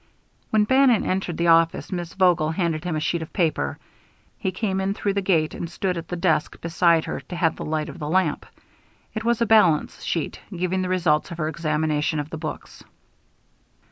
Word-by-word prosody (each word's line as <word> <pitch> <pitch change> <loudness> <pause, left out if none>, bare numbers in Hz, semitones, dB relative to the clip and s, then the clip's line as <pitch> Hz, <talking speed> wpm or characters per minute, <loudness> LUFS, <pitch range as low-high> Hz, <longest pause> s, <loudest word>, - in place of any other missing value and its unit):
When 215 -1 +3
Bannon 260 -1 +4
entered 185 -3 -1
the 170 - 0
office, 165 0 +3
Miss 175 -2 -4
Vogel 175 -5 +3
handed 165 -2 -1
him 175 -3 -1
a - - 0
sheet 170 +2 -1
of 160 - -7
paper. 155 - 0 0.6
He 190 - -1
came 190 0 -1
in 195 +1 -1
through 200 -2 -1
the 200 - 0
gate 165 -5 +1
and 170 - -5
stood 180 +2 -2
at 165 -1 -6
the 180 - -4
desk 175 -3 0
beside 170 0 +2
her - - -4
to 180 - -9
have 170 -2 +1
the - - -6
light 155 0 -2
of - - -9
the 150 - -4
lamp. 180 -3 +1 0.7
It 215 - -4
was 235 0 +2
a - - +2
balance 210 -8 +3
sheet, 165 - -3
giving 180 0 -1
the 185 - -2
results 170 -5 +1
of 170 - -7
her 155 -2 -1
examination 155 -1 -1
of 145 +2 -5
the 160 - -4
books. 155 -1 -7
170 Hz, 205 wpm, -23 LUFS, 155-190 Hz, 0.7 s, Bannon